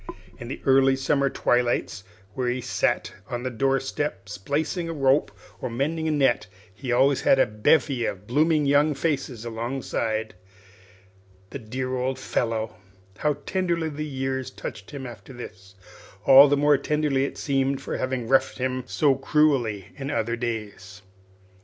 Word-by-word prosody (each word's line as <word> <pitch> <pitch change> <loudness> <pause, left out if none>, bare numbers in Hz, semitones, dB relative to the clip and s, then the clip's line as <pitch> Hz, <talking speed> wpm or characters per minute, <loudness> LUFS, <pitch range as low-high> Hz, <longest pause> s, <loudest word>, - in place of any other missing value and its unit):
In 120 - -7
the 130 - -6
early 135 0 +5
summer 140 +1 +1
twilights, 120 -7 0 0.3
when 125 +1 -1
he 125 - -2
sat 125 - -1 0.2
on 120 -1 -4
the 130 - -2
door 135 +3 +1
step 135 -6 -4
splicing 145 - -2
a - - -3
rope 135 -1 +2 0.3
or - - -3
mending 155 +7 -1
a - - +1
net, 135 -9 +2 0.3
he 125 +5 -5
always 135 +3 +3
had - - +4
a - - +5
bevy 120 +4 +2
of 100 +1 -5
blooming 150 +5 +2
young 145 +2 +3
faces 135 -6 -2
alongside. 115 -2 -3 1.2
The 140 - -5
dear 130 +3 -4
old 130 +1 -1
fellow! 115 -4 -2 0.4
How 150 -1 +1
tenderly 170 -4 -1
the 150 0 -5
years 135 -2 -3
touched 110 -3 -8
him 140 -2 -7
after 120 +1 -10
this 95 -6 -11 0.5
all 135 +1 +9
the 145 0 +2
more 145 -1 +4
tenderly, 150 -2 +1
it - - -6
seemed, 135 -1 0
for - - -4
having 130 -2 -2
roughed 135 +2 +2
him 130 0 -2
so 135 +9 +3
cruelly 135 - +1
in 135 0 -5
other 115 -5 -1
days! 105 -5 -5
130 Hz, 155 wpm, -25 LUFS, 115-145 Hz, 1.2 s, all